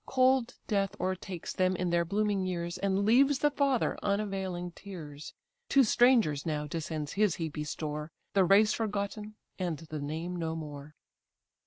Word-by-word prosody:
Cold 260 Hz, -2 st, +3 dB
death 200 Hz, -2 st, 0 dB
o'ertakes 185 Hz, -1 st, -3 dB
them 185 Hz, 0 st, +2 dB
in 180 Hz, -1 st, -1 dB
their 170 Hz, 0 st, +3 dB
blooming 200 Hz, +2 st, 0 dB
years, 175 Hz, -1 st, -3 dB
And 195 Hz, +1 st, +1 dB
leaves 270 Hz, +5 st, +5 dB
the 295 Hz, +2 st, +2 dB
father 275 Hz, -3 st, +1 dB
unavailing 195 Hz, -3 st, -2 dB
tears: 155 Hz, -6 st, -9 dB, 0.3 s
To 275 Hz, -, +6 dB
strangers 225 Hz, -, +4 dB
now 150 Hz, -2 st, -2 dB
descends 155 Hz, -1 st, -4 dB
his 205 Hz, -4 st, +2 dB
heapy 155 Hz, -2 st, -4 dB
store, 150 Hz, +1 st, -4 dB, 0.2 s
The 195 Hz, -, +5 dB
race 200 Hz, +4 st, +5 dB
forgotten, 210 Hz, 0 st, -3 dB, 0.2 s
and 175 Hz, -4 st, -1 dB
the 155 Hz, -1 st, -7 dB
name 160 Hz, +5 st, -4 dB
no 165 Hz, -1 st, -2 dB
more. 150 Hz, -1 st, -8 dB
185 Hz, 150 wpm, -30 LUFS, 160-210 Hz, 0.3 s, To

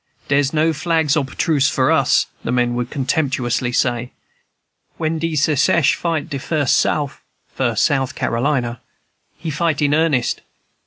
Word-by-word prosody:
"Dere's 140 Hz, -1 st, +2 dB
no 160 Hz, +1 st, +2 dB
flags 160 Hz, -2 st, +1 dB
ob 140 Hz, -3 st, -1 dB
truce 145 Hz, -5 st, +2 dB
for -, -, +1 dB
us," -, -, +3 dB, 0.2 s
the -, -, -2 dB
men 120 Hz, -1 st, +1 dB
would 120 Hz, 0 st, -3 dB
contemptuously 130 Hz, -3 st, -1 dB
say. 120 Hz, 0 st, -1 dB, 0.8 s
"When 160 Hz, 0 st, -1 dB
de 165 Hz, 0 st, -2 dB
Secesh 150 Hz, +2 st, +3 dB
fight 165 Hz, -4 st, -2 dB
de 140 Hz, -4 st, -4 dB
Fus' 145 Hz, -1 st, 0 dB
Souf" 145 Hz, -3 st, 0 dB, 0.3 s
(First 120 Hz, -5 st, +1 dB
South 135 Hz, -1 st, 0 dB
Carolina), 120 Hz, -1 st, -1 dB, 0.6 s
"he 160 Hz, 0 st, -5 dB
fight 155 Hz, 0 st, 0 dB
in 145 Hz, -1 st, +2 dB
earnest." 155 Hz, -6 st, +1 dB
145 Hz, 145 wpm, -19 LUFS, 125-160 Hz, 0.8 s, us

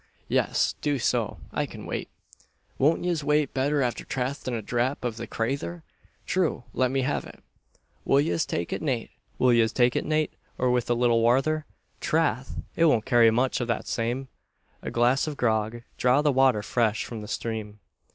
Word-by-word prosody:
"Yes, -, -, +1 dB
do 145 Hz, -1 st, +1 dB
so. 125 Hz, -, 0 dB
I -, -, -1 dB
can -, -, -10 dB
wait." -, -, -4 dB, 0.7 s
"Won't 150 Hz, +5 st, +3 dB
yez 175 Hz, -4 st, 0 dB
wait 150 Hz, -1 st, +1 dB
betther 140 Hz, +2 st, +1 dB
afther 120 Hz, -1 st, -2 dB
tastin' 130 Hz, 0 st, -3 dB
a 115 Hz, -, -3 dB
dhrap 125 Hz, +4 st, -1 dB
av 115 Hz, -2 st, -2 dB
the 115 Hz, 0 st, -6 dB
crayther?" 140 Hz, +8 st, -3 dB, 0.4 s
"True 180 Hz, -9 st, 0 dB
let 130 Hz, -1 st, +2 dB
me 135 Hz, +1 st, 0 dB
have 145 Hz, -, -1 dB
it." -, -, -13 dB, 0.6 s
"Will 135 Hz, -, +4 dB
yez 155 Hz, +1 st, +1 dB
take 85 Hz, -, -3 dB
it -, -, -3 dB
nate, 130 Hz, -7 st, -2 dB, 0.3 s
or 125 Hz, +3 st, +1 dB
with 125 Hz, -1 st, 0 dB
a 120 Hz, -, +3 dB
little 120 Hz, -1 st, +3 dB
wather? 135 Hz, +7 st, +2 dB, 0.3 s
Trath! 140 Hz, -6 st, 0 dB
it 165 Hz, -, +4 dB
won't 115 Hz, -9 st, +3 dB
carry 120 Hz, -3 st, +5 dB
much 125 Hz, +3 st, +1 dB
av 120 Hz, -, -2 dB
that 115 Hz, -, -1 dB
same." 120 Hz, +3 st, -2 dB, 0.5 s
"A -, -, -4 dB
glass 125 Hz, +5 st, +2 dB
of 150 Hz, -2 st, -4 dB
grog 110 Hz, 0 st, 0 dB, 0.2 s
draw 125 Hz, +4 st, +4 dB
the 150 Hz, -, +4 dB
water 130 Hz, -5 st, +3 dB
fresh 110 Hz, -2 st, 0 dB
from 115 Hz, -3 st, -7 dB
the 105 Hz, -, -8 dB
stream." 110 Hz, -2 st, -4 dB
125 Hz, 170 wpm, -26 LUFS, 115-145 Hz, 0.7 s, carry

